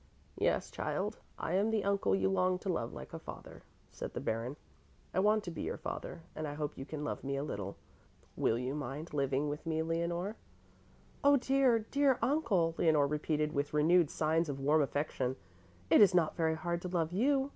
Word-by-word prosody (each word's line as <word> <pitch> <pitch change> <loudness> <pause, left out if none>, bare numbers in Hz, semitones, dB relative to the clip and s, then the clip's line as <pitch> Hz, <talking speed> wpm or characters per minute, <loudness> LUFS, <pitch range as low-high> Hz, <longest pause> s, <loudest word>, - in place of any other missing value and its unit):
"Yes, - - +1
child, - - -2 0.2
I 165 - -3
am 200 +4 +3
the 220 -2 +1
uncle 200 - +2
you 95 0 +1
longed 180 - +1
to 195 - -4
love 115 -6 -2
like 65 - -9
a - - -5
father," - - -10 0.3
said - - -7
the - - -1
Baron. 115 +5 -2 0.6
"I - - +1
want 210 +2 +3
to 175 - -5
be 165 - -6
your - - -3
father 165 - -6
and 155 0 -3
I 145 - -5
hope 150 -1 -3
you 135 - -7
can 150 -1 -5
love 150 - -3
me 140 0 -2
a 140 - -1
little. 100 -8 -5 0.6
Will 115 - +2
you 125 +2 -2
mind 150 +3 -5
living 140 0 +1
with 145 +1 -4
me, 160 0 0
Leonore?" 170 +5 -2 0.9
"Oh, 285 0 +7
dear, 265 -2 +3
dear 265 +4 +2
uncle," 225 - +2
Leonore 155 -3 +4
repeated 150 +1 0
with 145 +1 -1
renewed 165 +1 +4
signs 160 +1 +1
of 135 -1 -3
warm 150 +3 +3
affection. 135 -2 -1 0.6
"It - - +8
is 200 -3 +7
not 165 -3 +3
very 160 -1 +1
hard 170 +1 -2
to 180 - -4
love 170 -2 0
you. 270 +6 +2
160 Hz, 200 wpm, -33 LUFS, 145-190 Hz, 0.9 s, It